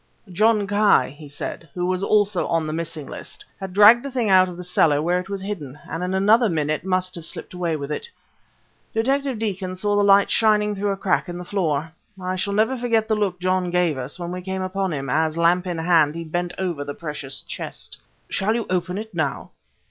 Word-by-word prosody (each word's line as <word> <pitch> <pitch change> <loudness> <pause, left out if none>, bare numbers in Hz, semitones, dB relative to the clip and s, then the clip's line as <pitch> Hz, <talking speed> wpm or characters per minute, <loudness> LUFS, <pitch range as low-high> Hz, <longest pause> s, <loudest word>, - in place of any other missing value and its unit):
"John 215 +2 +3
Ki," 205 -4 +3
he 150 -1 -12
said, 145 +2 -6
"who 175 -1 -1
was 185 0 0
also 205 -2 +2
on 165 -2 0
the 155 - -3
missing 165 -2 -4
list, - - -9
had 190 -1 -6
dragged 210 +5 +7
the 280 - -5
thing 245 -6 0
out 185 -1 +6
of 175 - -9
the 180 - -6
cellar 160 -4 +3
where 175 +4 +1
it 180 +2 -8
was 200 -1 -4
hidden, 155 -10 -5
and 165 +3 -4
in 185 +1 -1
another 215 +4 +4
minute 155 -2 -1
must 185 -1 0
have 170 - -7
slipped 165 - -6
away 175 -3 -1
with 145 -1 -5
it. 470 - -4 0.9
Detective 270 +2 +1
Deacon 190 -4 -3
saw 205 +2 0
the 205 - +3
light 200 0 +5
shining 210 -1 +3
through 205 0 -1
a 195 - -1
crack 190 -1 0
in 175 - -5
the 180 - -7
floor. 165 -5 -1 0.3
I 185 0 -2
shall 200 +2 -2
never 220 +5 +2
forget 230 -3 +1
the 220 - +1
look 195 -4 -1
John 185 0 0
gave 175 -3 +1
us 130 +2 -5
when 175 -1 -5
we 180 0 -5
came 190 +1 -3
upon 190 0 -2
him, 140 -3 -3
as, 155 +4 +1
lamp 175 +2 +3
in 175 -2 -2
hand, 160 -2 +3
he 170 - -4
bent 175 +2 -3
over 175 -6 -2
the 145 0 -6
precious 145 -4 -6
chest." - - -7 0.3
"Shall 215 +3 0
you 235 -2 -1
open 180 0 -1
it 220 0 -6
now?" 155 -5 -2
185 Hz, 225 wpm, -23 LUFS, 165-205 Hz, 0.9 s, dragged